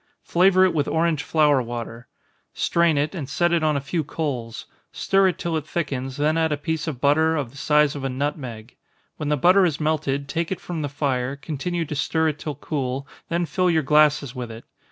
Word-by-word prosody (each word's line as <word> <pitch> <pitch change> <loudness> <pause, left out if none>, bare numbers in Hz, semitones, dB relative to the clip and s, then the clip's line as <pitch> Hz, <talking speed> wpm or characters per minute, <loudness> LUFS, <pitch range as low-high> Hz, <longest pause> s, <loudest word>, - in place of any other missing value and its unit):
Flavor 185 +1 +4
it 185 - +1
with 145 -3 0
orange 160 -2 +1
flower 150 -3 +3
water 120 0 -6 0.5
strain 170 -3 +2
it, 145 +2 0
and 150 -8 -5
set 175 +4 +1
it 170 - +2
on 155 -2 +2
a - - 0
few 155 +4 -2
coals 135 -5 -4 0.3
stir 195 0 +2
it 185 - -1
till 170 -1 -2
it 155 -1 -3
thickens, 135 -6 -3
then 155 +3 +1
add 160 -1 +1
a 150 - 0
piece 160 +1 -3
of 145 -6 -4
butter, 155 +4 +3
of 140 -6 -3
the 140 - -15
size 150 0 +3
of 140 - -6
a 135 - -1
nutmeg. 130 -4 -5 0.4
When 150 -2 -3
the 150 - +2
butter 185 +7 +5
has 160 -5 +1
melted, 150 -3 -1
take 165 +4 -2
it 190 - -2
from 170 -3 -5
the 145 - -2
fire, 135 -2 -1
continue 160 +4 -3
to 150 - -5
stir 160 +3 +1
it 150 - -5
till 150 -2 -5
cool, 135 -2 -3 0.2
then 170 +1 0
fill 180 +4 +1
your 160 -2 +2
glasses 150 -2 +3
with 125 -3 -6
it. 115 +1 -10
150 Hz, 215 wpm, -23 LUFS, 140-160 Hz, 0.5 s, butter